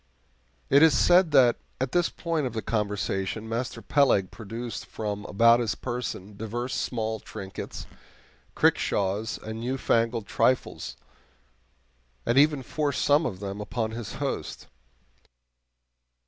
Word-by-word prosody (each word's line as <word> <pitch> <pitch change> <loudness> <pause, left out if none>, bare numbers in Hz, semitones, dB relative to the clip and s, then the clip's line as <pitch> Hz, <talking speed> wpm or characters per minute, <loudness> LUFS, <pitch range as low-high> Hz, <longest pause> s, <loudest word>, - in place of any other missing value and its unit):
It 140 - +7
is 160 -1 +6
said 180 -1 +5
that 125 -5 +5 0.2
at 130 0 -1
this 175 -1 +2
point 165 -5 -2
of 120 - -6
the 110 - -3
conversation 105 0 -2
Master 115 +3 -3
Peleg 125 -10 +3
produced 115 +2 -6
from 105 -2 -4
about 115 +3 +5
his 115 -4 -1
person 120 -5 -5
divers 120 +4 -4
small 110 -2 -2
trinkets, 95 -1 -7 0.7
kickshaws, 100 +3 +1
and 110 +1 -7
newfangled 115 -3 0
trifles, 130 +4 0 1.3
and 120 - +1
even 145 -2 +4
forced 145 0 -1
some 145 +3 +4
of 95 -4 -6
them 100 +1 -5
upon 110 +1 -2
his 115 -1 -6
host. - - -4
115 Hz, 120 wpm, -27 LUFS, 105-130 Hz, 1.3 s, It